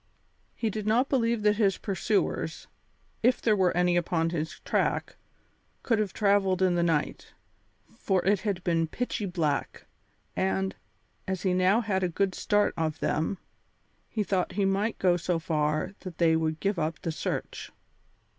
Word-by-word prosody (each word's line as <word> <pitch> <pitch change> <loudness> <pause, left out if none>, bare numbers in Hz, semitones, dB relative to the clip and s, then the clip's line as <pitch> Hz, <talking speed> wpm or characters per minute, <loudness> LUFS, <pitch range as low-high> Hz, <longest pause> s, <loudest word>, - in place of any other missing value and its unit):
He 225 -2 -1
did 215 0 -4
not 240 +5 +3
believe 235 -4 +1
that 210 0 +3
his 200 -4 +2
pursuers, 200 +1 -1 0.6
if 245 +2 +3
there 215 -2 +3
were 185 -3 +3
any 180 0 +3
upon 165 -1 +1
his 160 -2 -3
track, - - 0 0.7
could 230 -3 +1
have 210 -3 0
travelled 195 -3 +2
in 185 -1 +3
the 175 - +1
night, 165 -3 -1 0.7
for 190 -2 +1
it 200 0 +3
had 200 -5 -2
been 165 -2 +1
pitchy 220 +1 -3
black; 165 -5 -2 0.5
and, 190 0 0 0.5
as 190 -2 -3
he 185 -2 +2
now 185 +5 +3
had 200 -4 0
a 180 - +1
good 190 +2 0
start 205 +2 +1
of 160 -1 -2
them, 160 +5 0 0.7
he 215 - -1
thought 190 -2 -1
he 200 0 +1
might 195 +3 0
go 180 -2 +3
so 175 0 -1
far 155 +2 -1
that 185 -4 -9
they 165 -1 +4
would 160 -1 -1
give 195 0 0
up 160 0 -2
the 165 - -1
search. - - -4
190 Hz, 165 wpm, -28 LUFS, 170-205 Hz, 0.7 s, they